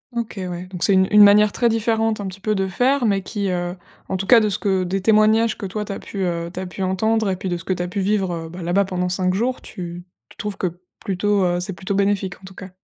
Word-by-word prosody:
OK, 230 -2 -4
ouais 180 -1 -5
donc 180 -3 -7
c'est 200 - +4
une 190 0 +4
une 210 0 +8
manière 205 +1 +6
très 235 +2 +1
différente, 225 -1 0
un 205 - -4
petit 190 +1 -8
peu, 215 +1 0
de 195 -1 0
faire, 250 +7 +1
mais 200 -3 +2
qui, 200 0 -3
heu, 175 0 -2 0.3
en 190 - -2
tout 190 - -3
cas 240 +3 +7
de 215 -1 +1
ce 195 - 0
que 190 -2 0
des 190 +2 -2
témoignages 215 +2 +4
que 200 - -5
toi 210 +3 -4
tu - - -6
as - - -6
pu 195 -2 -5
heu 170 -1 -2
tu 180 - -6
as 190 - -4
pu 180 +2 -8
entendre 215 +3 +1
et 190 - 0
puis 185 - -6
de 175 -1 -1
ce 170 - -10
que 190 - -1
tu 175 - -3
as - - -3
pu 200 +3 -4
vivre 195 -2 0
heu, 165 -1 -5
bah 175 +1 -8
là-bas 180 +4 +2
pendant 180 -1 -2
5 185 0 0
jours, 245 +5 -1
tu 175 -1 -8 0.3
tu - - -18
trouves 210 -3 -4
que 175 -1 -3 0.2
plutôt, 200 +1 0
heu 175 0 +1
c'est 185 +2 -4
plutôt 185 +3 -4
bénéfique 195 -2 0
en - - -25
tout 190 0 -12
cas? 190 0 -9
195 Hz, 290 wpm, -21 LUFS, 180-210 Hz, 0.3 s, une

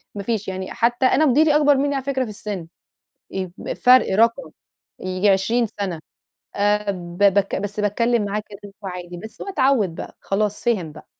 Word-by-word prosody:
ما 200 - -4
فيش 215 -1 -2
يعني 190 0 -5
حتى 240 +2 +1
أنا 310 +4 +4
مديري 300 +2 +4
أكبر 290 -1 +5
مني 285 +1 0
على 270 - -2
فكرة 265 -1 -1
في 240 - -6
السِن، 205 -4 -6 0.6
ي 190 -1 -3 0.3
فرق 250 -4 +5
رقم 230 +5 +2 0.5
ييجي 185 +2 0
20 210 +5 +2
سنة 185 -5 -2 0.6
آآ، 205 0 +1
ب 175 -2 -7
بك 200 -1 +3
بس 205 +1 -3
باتكلم 230 +2 +1
معاه 205 +1 -2
باكلمه 205 0 -11
عادي، 180 -2 -6
بس 220 +5 -10
هو - - -7
اتعود 260 - +2
بقى - - -8
خلاص 210 +1 -2
فهم 195 -10 0
بقى. - - -14
210 Hz, 175 wpm, -22 LUFS, 190-245 Hz, 0.6 s, أكبر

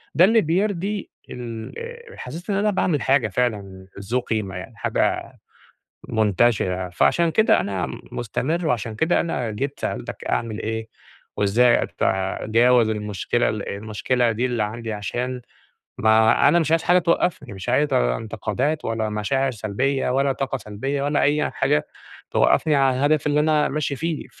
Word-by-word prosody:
ده 175 - +7
اللي 225 +3 +4
بيرضي 195 +3 -1 0.2
ال 115 -2 -7
آآ، 470 -1 -9
حسّيت 165 - -8
إن 200 - +1
أنا 205 +2 +2
باعمل 175 -6 0
حاجة 135 -3 +3
فعلًا 100 -4 -3
ذو 110 +6 -1
قيمة 110 -6 -3
يعني، 90 - -8
حاجة - - -1 0.8
منتشرة. 100 -4 +1
فعشان 170 - +2
كده 220 +6 +4
أنا 95 -1 -2 0.3
مستمر، 160 - -2
وعشان 115 -5 -1
كده 160 +10 +2
أنا 130 -9 -2
جيت 135 +7 -4
سألتك - - -4
أعمل 110 -2 -2
إيه، 110 +1 -3 0.5
وإزاي 115 +4 +3 0.2
أتجاوز 115 +5 +2
المشكلة 105 +2 -1
المشكلة 110 +4 -1
دي 120 +4 0
اللي 120 -3 -1
عندي. 110 +2 -4
عشان 120 +5 -3 0.6
ما 110 +4 +4
أنا 160 +4 +5
مش 160 -2 0
عايز 165 0 +3
حاجة 180 +1 +4
توقفني 165 - 0
مش 95 -1 -6
عايز 145 -1 +2
انتقادات 110 - -1
ولا 115 -1 -1
مشاعر 130 +6 0
سلبيّة 125 +6 -1
ولا 135 +2 +2
طاقة 135 0 -2
سلبيّة 135 +6 -4
ولا 145 +1 +1
أي 150 +1 +2
حاجة 75 - +1 0.4
توقفني 155 -2 +3
عن 135 -2 +3
الهدف 145 +3 +2
اللي 145 0 +2
أنا 150 0 +3
ماشي 145 -1 -2
فيه. 160 +2 -3
125 Hz, 150 wpm, -22 LUFS, 110-150 Hz, 0.8 s, ده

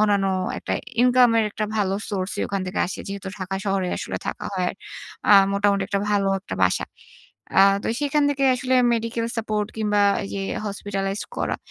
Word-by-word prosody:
অন্যান্য 205 -2 +3 0.3
একটা - - -4 0.3
ইনকাম 250 0 +6
এর 220 - +3
একটা 215 0 -3
ভালো 195 -2 +1 0.2
সোর্সই 190 -1 -2
ওখান 195 -1 -2
থেকে 185 - -3
আসে। 190 - -6
যেহেতু 195 -1 -5
ঢাকা 190 0 -3
শহরে 195 -2 0
আসলে - - -4
থাকা - - -4
হয় 180 0 -1 0.5
আ - - +8 0.2
মোটামুটি 200 0 +2
একটা 200 - 0
ভালো 200 -1 +2
একটা 95 - -6
বাসা। 90 - +2 0.7
আ - - +9 0.2
তো - - -2
সেখান 290 0 +1
থেকে 275 -1 0
আসলে 255 +1 0 0.2
মেডিকেল 230 0 -2
সাপোর্ট 215 -2 -1
কিংবা 210 -1 +1 0.2
এই 195 - -6
যে 195 - -2 0.3
Hospitalised 195 0 -3
করা। - - -1
205 Hz, 175 wpm, -23 LUFS, 195-225 Hz, 0.7 s, আ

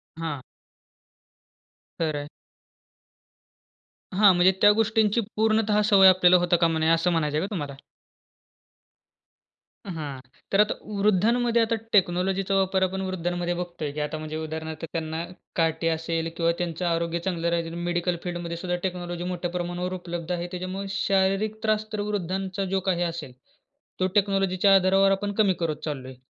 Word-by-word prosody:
हां. 160 -4 -4 1.6
खरं 155 -3 -1
आहे. 145 - -6 1.9
हां, 200 -1 +7
म्हणजे 180 +2 +5
त्या 205 0 +8
गोष्टींची 220 +1 +2
पूर्णतः 215 -1 +2
सवय 195 -3 +7
आपल्याला 180 -1 +6
होता 175 0 +2
कामा 165 -1 +2
नये, 160 0 +2
असं 165 +2 +3
म्हणायचं 150 -3 0
आहे 170 - 0
का - - -17
तुम्हाला? 145 -4 -4 2.1
अं, 195 - -5
हां, 145 -4 -5 0.3
तर 195 - +3
आता 210 - +2 0.3
वृद्धांमध्ये 230 +4 +3
आता 225 0 +1 0.2
टेक्नॉलॉजीचा 190 +1 +2
वापर 190 0 +2
आपण 190 +1 -1
वृद्धांमध्ये 175 -2 -2
बघतोय, 175 -4 -4
की 150 - -6
आता 155 - -5
म्हणजे 155 0 -5
उदाहरणार्थ 160 0 -5
त्यांना 160 0 -3 0.3
काठी 165 0 +1
असेल 165 0 -1
किंवा 170 0 +2
त्यांचं 175 0 -3
आरोग्य 170 0 0
चांगलं 170 -2 -2
राहीलं. 170 -1 -2
मेडिकल 175 0 0
फील्डमध्ये 175 -1 -4
सुद्धा 180 0 -2
टेक्नॉलॉजी 175 -1 -4
मोठ्या 175 0 -4
प्रमाणावर 180 +1 -3
उपलब्ध 175 -1 -5
आहे. 175 0 -2
त्याच्यामुळे 185 +2 -5
शारीरिक 195 +2 +1
त्रास 215 0 +1
तर 210 - -2
वृद्धांचा 190 0 -2
जो - - +2
काही 175 -1 +1
असेल, 165 -7 -5 0.7
तो 185 - +2
टेक्नॉलॉजीच्या 195 -1 +3
आधारावर 195 +1 +4
आपण 205 +1 -1
कमी 205 -4 +3
करत 165 -3 -1
चाललोय. 130 -3 -5
180 Hz, 145 wpm, -25 LUFS, 165-195 Hz, 2.1 s, त्या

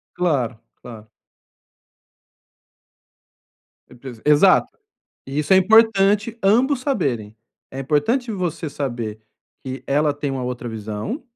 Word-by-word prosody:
Claro, 130 -10 -1 0.2
claro. 110 -3 -11 2.8
Certeza 125 -2 -12
Exato. 150 +6 +4 0.5
E 135 +2 -4
isso 150 +5 +1
é - - +8
importante 210 +1 +4
ambos 250 +7 +3
saberem. 125 - -2 0.4
É 135 - -5
importante 225 - 0
você 175 -5 -3
saber 120 -7 -5 0.4
que 130 0 -6
ela 145 +1 +2
tem 145 -1 -3
uma 130 -1 -3
outra 125 -1 -5
visão, 110 - -5
145 Hz, 105 wpm, -21 LUFS, 120-200 Hz, 2.8 s, é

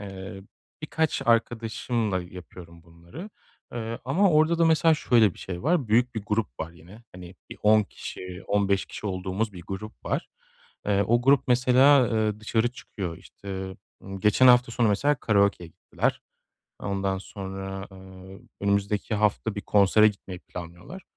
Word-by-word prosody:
ııı, 95 -1 -8 0.4
birkaç 160 0 -1
arkadaşımla 115 -3 0
yapıyorum 90 -1 -12
bunları, 85 - -12 0.4
ııı, 115 -1 -5
ama 180 +10 +3
orada 160 +1 +3
da, 170 - +4
mesela, 160 0 +4
şöyle 115 - +3
bir - - -17
şey 90 -2 -6
var, 155 -7 +1
büyük 120 +3 +2
bir 110 - -4
grup 105 -3 -2
var 80 - -4
yine. 90 +7 -16
Hani, 90 0 -11 0.2
bir - - -9
10 105 0 +5
kişi, 90 -2 -9
15 100 -1 +1
kişi - - -7
olduğumuz 95 +3 -2
bir 90 -2 -10
grup 105 +3 -8
var. - - -2 0.6
Iıı, 100 -1 +2
o 120 +3 +2
grup, 135 0 +3
mesela, 130 +3 +5
ııı, 110 -2 -1
dışarı 110 +2 0
çıkıyor, 90 -8 -7
işte, 95 -1 -8 0.3
ı 95 0 -8
geçen 105 +5 +4
hafta 125 -1 +5
sonu, 120 -2 +2
mesela, 140 +9 +2
karaokeye 100 -7 +1
gittiler. 85 +2 -3 0.6
Ondan 95 -1 -2
sonra, 95 0 -7
ııı, 95 0 -13 0.2
önümüzdeki 100 +2 0
hafta 105 - 0
bir - - -2
konsere 105 +1 +4
gitmeyi 95 -3 -8
planlıyorlar. 90 - -10
105 Hz, 150 wpm, -26 LUFS, 95-120 Hz, 0.6 s, 10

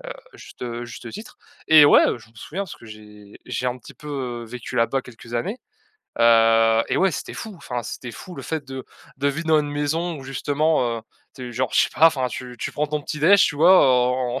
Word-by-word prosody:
Heu, - - -14 0.2
à - - -15
juste, - - -15
heu, 120 0 -5
juste 120 0 -9
titre 215 +2 -10 0.3
et 155 -1 +8
ouais, 145 - +7
heu, - - -1
je 115 -1 -18
me 115 - -29
souviens 175 - -6
parce 190 - -7
que 115 - -16
j'ai 105 -1 -14
j'ai 125 - -3
un 125 0 -2
petit 120 - -14
peu, 150 - -13 0.4
heu, - - -10
vécu 120 +1 -7
là-bas 125 +4 +1
quelques 120 -1 -13
années. 185 - -2 0.6
Heu 115 -1 +5
et - - 0
ouais 190 -2 +2
c'était - - -6
fou, 220 -2 -7
enfin 125 -7 -5
c'était 125 - -7
fou 180 +9 -10
le 135 - -8
fait 155 +1 -4
de 130 -1 -7 0.3
de 140 +1 +1
vivre 155 +4 -4
dans 155 -1 +4
une 145 - -4
maison 155 +4 -2
où 135 - -10
justement, 135 -2 0
heu, - - -12 0.3
tu 125 -1 -7
es - - -10
genre, 125 +1 -1
je - - +5
sais - - 0
pas, 160 - +6
enfin 130 -5 -2
tu 125 0 -7
tu - - -4
prends 150 0 -2
ton 150 0 -2
petit 150 +1 -6
déj, 195 +6 +6
tu 155 - -1
vois 175 +6 +6 0.3
en 125 0 -2
130 Hz, 245 wpm, -22 LUFS, 120-155 Hz, 0.6 s, et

